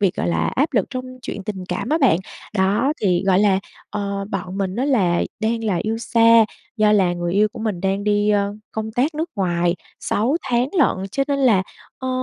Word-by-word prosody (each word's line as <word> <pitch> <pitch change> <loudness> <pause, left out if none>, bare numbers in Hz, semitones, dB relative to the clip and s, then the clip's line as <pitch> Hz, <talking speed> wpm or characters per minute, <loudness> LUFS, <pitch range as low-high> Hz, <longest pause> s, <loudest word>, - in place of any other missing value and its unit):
việc, 195 -3 +2
gọi 85 - -1
là, 85 -1 +1
áp 285 +4 +1
lực 210 -7 +2
trong 255 -2 -4 0.2
chuyện 205 - -5
tình 190 -3 -5
cảm - - -3
á 315 - +2
bạn. 260 - +4 0.4
Đó, 205 +8 +2
thì, 180 -4 +2
gọi 190 -1 +4
là, 200 -2 +4 0.3
ờ, 200 -1 -3
bọn 190 0 -4
mình 190 0 -2
á 255 - 0
là 190 -11 +2 0.2
đang 225 +1 -1
là 205 -5 +1
yêu 220 +1 -2
xa, 230 -1 +5 0.3
do 215 -1 +4
là 190 -4 +3
người 175 0 -2
yêu 210 +3 +3
của 245 - -9
mình 215 -5 -2
đang 195 +2 -1
đi, 205 0 +2
a, 205 -1 +2 0.3
công 220 0 -4
tác 270 +8 0
nước 320 +3 -3
ngoài 175 -2 +1 0.3
6 240 +9 +1
tháng 250 -1 +1
lận, 195 -9 +2
cho 275 - 0
nên 280 - +1
là, 230 -9 +4 0.4
ơ, 260 - -4
210 Hz, 215 wpm, -21 LUFS, 190-235 Hz, 0.4 s, xa